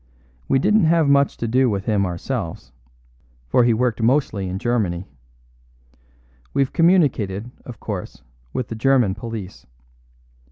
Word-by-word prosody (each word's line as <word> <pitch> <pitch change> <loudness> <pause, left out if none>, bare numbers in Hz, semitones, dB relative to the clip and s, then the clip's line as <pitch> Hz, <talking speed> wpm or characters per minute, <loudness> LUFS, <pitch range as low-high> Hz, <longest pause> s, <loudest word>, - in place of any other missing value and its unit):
We 135 - +3
didn't 210 +7 +3
have 160 -1 +3
much 140 0 +3
to 115 - -3
do 125 +2 +3
with 100 -2 -2
him 100 -3 +1
ourselves, 90 - -5 0.8
for 120 - +3
he 120 - +4
worked 120 0 0
mostly 115 -6 +1
in 95 - -3
Germany. 100 -6 -1 1.5
We've 135 -1 +1
communicated, 125 - +2
of 120 -4 -9
course, 100 -5 -6 0.3
with 125 - -3
the 115 - -4
German 125 -4 +2
police. 105 -2 -8
115 Hz, 130 wpm, -21 LUFS, 100-135 Hz, 1.5 s, he